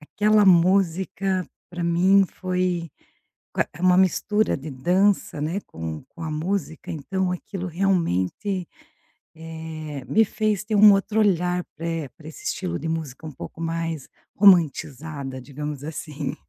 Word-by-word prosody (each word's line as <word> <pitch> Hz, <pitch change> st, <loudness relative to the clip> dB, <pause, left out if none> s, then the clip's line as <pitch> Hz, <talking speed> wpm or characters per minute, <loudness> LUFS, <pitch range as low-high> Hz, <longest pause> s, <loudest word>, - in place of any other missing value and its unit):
aquela 210 Hz, +6 st, +3 dB
música 185 Hz, +1 st, +3 dB, 0.2 s
pra 175 Hz, -1 st, -4 dB
mim 185 Hz, +3 st, +4 dB
foi 180 Hz, -3 st, -2 dB, 0.6 s
com -, -, -2 dB
a -, -, -15 dB
é 175 Hz, -, -11 dB
uma 180 Hz, 0 st, +5 dB
mistura 210 Hz, +3 st, +2 dB
de 145 Hz, +2 st, -7 dB
dança, 180 Hz, +4 st, +1 dB
né, 165 Hz, +7 st, -1 dB
com 80 Hz, -1 st, -6 dB
com 165 Hz, -, -11 dB
a 160 Hz, -, -3 dB
música. 165 Hz, +2 st, -3 dB
Então 180 Hz, +4 st, -2 dB
aquilo 185 Hz, +1 st, -5 dB
realmente, 180 Hz, -, 0 dB, 0.7 s
eh, 160 Hz, -3 st, -7 dB
me 220 Hz, +11 st, +4 dB
fez 215 Hz, -1 st, -1 dB
ter 210 Hz, +1 st, -2 dB
um 210 Hz, 0 st, +9 dB
outro 205 Hz, +2 st, 0 dB
olhar 180 Hz, -3 st, +2 dB
pra, 165 Hz, +2 st, -7 dB
eh, 165 Hz, -5 st, -3 dB
pra 155 Hz, -, -12 dB
esse 160 Hz, -, -11 dB
estilo 85 Hz, -1 st, -2 dB
de 160 Hz, -, -4 dB
música 160 Hz, -3 st, -4 dB
um 155 Hz, -, -6 dB
pouco 145 Hz, -, -10 dB
mais 165 Hz, -3 st, -3 dB, 0.3 s
romantizada, 150 Hz, -7 st, +2 dB
digamos 145 Hz, +1 st, -6 dB
assim. 150 Hz, -2 st, -5 dB
170 Hz, 145 wpm, -24 LUFS, 155-190 Hz, 0.7 s, um